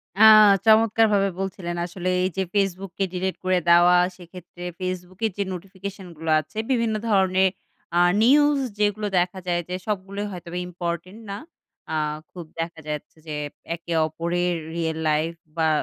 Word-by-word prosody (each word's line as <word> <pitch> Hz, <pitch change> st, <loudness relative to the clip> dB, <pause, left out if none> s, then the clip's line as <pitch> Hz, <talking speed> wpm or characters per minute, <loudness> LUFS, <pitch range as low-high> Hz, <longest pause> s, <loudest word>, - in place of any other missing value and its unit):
আ 205 Hz, -, -1 dB, 0.4 s
চমৎকার 225 Hz, 0 st, +5 dB
ভাবে 195 Hz, -1 st, +3 dB
বলছিলেন 185 Hz, -2 st, -4 dB
আসলে। 180 Hz, +1 st, -4 dB
এই 185 Hz, -, +1 dB
যে 190 Hz, -, +2 dB
Facebook 195 Hz, -1 st, 0 dB
কে 195 Hz, -, +3 dB
ডিলিট 185 Hz, +1 st, -2 dB
করে 185 Hz, -1 st, +2 dB
দেওয়া, 175 Hz, +1 st, +7 dB, 0.2 s
সেক্ষেত্রে 175 Hz, 0 st, -12 dB, 0.2 s
Facebook 185 Hz, 0 st, -5 dB
এর 220 Hz, -, 0 dB
যে 200 Hz, -, +1 dB
নোটিফিকেশন 190 Hz, +1 st, -8 dB
গুলো 160 Hz, 0 st, -2 dB
আছে, 155 Hz, +7 st, -10 dB
বিভিন্ন 230 Hz, -3 st, +1 dB
ধরনের 190 Hz, -1 st, +3 dB, 0.5 s
আ -, -, +5 dB, 0.2 s
নিউজ 290 Hz, +3 st, +5 dB, 0.2 s
যেগুলো 210 Hz, 0 st, +1 dB
দেখা 180 Hz, +2 st, -1 dB
যায় 175 Hz, -1 st, +1 dB
যে, 180 Hz, -, -2 dB
সবগুলোই 200 Hz, 0 st, -3 dB
হয়তোবা 175 Hz, -1 st, -7 dB
ইম্পোর্টেন্ট 175 Hz, +4 st, -5 dB
না। 200 Hz, -, -4 dB, 0.6 s
আ -, -, 0 dB, 0.4 s
খুব 175 Hz, -3 st, -8 dB
দেখা 165 Hz, 0 st, -4 dB
যাচ্ছে 150 Hz, +1 st, -6 dB
যে, 150 Hz, -, -4 dB, 0.4 s
একে 170 Hz, 0 st, -6 dB
অপরের 175 Hz, +3 st, -1 dB, 0.2 s
রিয়াল 160 Hz, -1 st, -1 dB
লাইফ 155 Hz, +2 st, +1 dB, 0.2 s
বা 160 Hz, -1 st, +2 dB
185 Hz, 155 wpm, -24 LUFS, 175-200 Hz, 0.6 s, দেওয়া